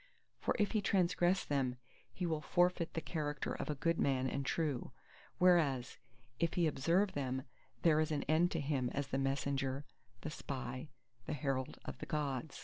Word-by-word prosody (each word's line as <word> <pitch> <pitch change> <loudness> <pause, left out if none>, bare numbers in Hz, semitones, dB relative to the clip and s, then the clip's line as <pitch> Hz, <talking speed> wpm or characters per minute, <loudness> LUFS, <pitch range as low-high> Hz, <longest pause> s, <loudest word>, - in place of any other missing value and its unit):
For - - 0
if 210 -3 +2
he 215 - +2
transgress 185 -1 +2
them, 130 -3 0 0.3
he 180 - -3
will 160 -3 0
forfeit 175 +2 +2
the 165 - 0
character 150 -3 -2
of - - -4
a 150 - 0
good 165 +4 +1
man 130 -1 +2
and 140 +1 -1
true; 145 -2 -1 0.5
whereas 155 -9 +3 0.4
if 170 -1 +1
he 175 - +3
observe 170 +7 +2
them, 130 -2 -2 0.4
there 155 -2 +5
is 155 0 +1
an 150 - 0
end 160 +4 +3
to 165 - 0
him 140 -4 0
as 140 0 -1
the 135 - 0
Messenger, 135 0 0 0.4
the 155 - -4
Spy, 130 -2 -5 0.4
the - - -1
Herald 135 -2 -1
of - - -6
the - - -6
Gods! 145 -1 -2
150 Hz, 175 wpm, -36 LUFS, 135-170 Hz, 0.5 s, there